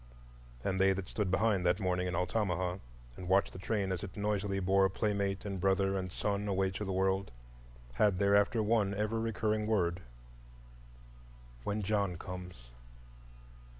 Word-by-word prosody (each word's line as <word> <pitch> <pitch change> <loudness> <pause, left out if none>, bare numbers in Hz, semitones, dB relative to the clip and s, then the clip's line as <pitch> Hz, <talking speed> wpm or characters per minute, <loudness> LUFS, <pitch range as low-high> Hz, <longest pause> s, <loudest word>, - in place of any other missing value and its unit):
And 95 -1 0
they 95 0 +5
that 95 -1 -5
stood 105 -3 -2
behind, 100 0 +2
that 90 +2 +2
morning 90 -2 0
in 90 - -2
Altamaha, 90 -1 0 0.4
and 90 +5 -7
watched 95 +1 +3
the - - -8
train 100 0 -1
as 90 - -2
it 100 +2 -8
noisily 100 -1 0
bore 95 +1 +3
playmate 100 -1 -1
and 100 -3 -4
brother 95 0 +2
and 95 -1 -3
son 100 +1 -1
away 95 -1 +1
to 95 +3 -4
the 95 - -3
world, 95 +1 +1 0.6
had 100 +7 +3
thereafter 100 +3 +3
one 105 -2 +2
ever 105 +2 -1
recurring 110 -1 0
word,—"When - - -6
John 100 -3 0
comes." 90 -10 -9
95 Hz, 150 wpm, -33 LUFS, 90-100 Hz, 0.6 s, they